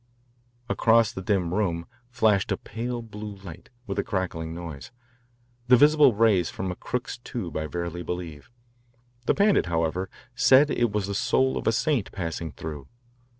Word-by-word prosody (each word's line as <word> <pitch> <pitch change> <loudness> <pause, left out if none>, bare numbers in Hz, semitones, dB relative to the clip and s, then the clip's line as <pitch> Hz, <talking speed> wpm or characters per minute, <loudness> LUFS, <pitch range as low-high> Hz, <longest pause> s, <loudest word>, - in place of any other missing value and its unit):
Across 115 -1 +3
the 95 - -6
dim 90 -3 0
room 85 -5 0 0.2
flashed 110 -4 +2
a 100 - +1
pale 120 +2 -5
blue 105 -2 -8
light 95 -4 -11 0.2
with 100 -3 -3
a - - +1
crackling 90 -4 -3
noise, 85 -4 -7 0.8
the 125 0 +7
visible 145 -2 +6
rays 105 -6 +3
from 95 -1 -4
a - - -5
Crookes 125 +3 -4
tube, 115 - -6
I 80 0 -2
verily 85 +1 -4
believe. 85 -4 -6 0.8
The - - +3
Pandit, 200 - +3
however, 85 +2 -1 0.2
said 135 +3 +5
it 120 -2 +1
was 105 -1 -1
the 100 - -4
soul 125 +4 +2
of - - -3
a - - +5
saint 120 -1 0
passing 85 -3 -4
through. 75 0 -7
100 Hz, 160 wpm, -26 LUFS, 85-120 Hz, 0.8 s, the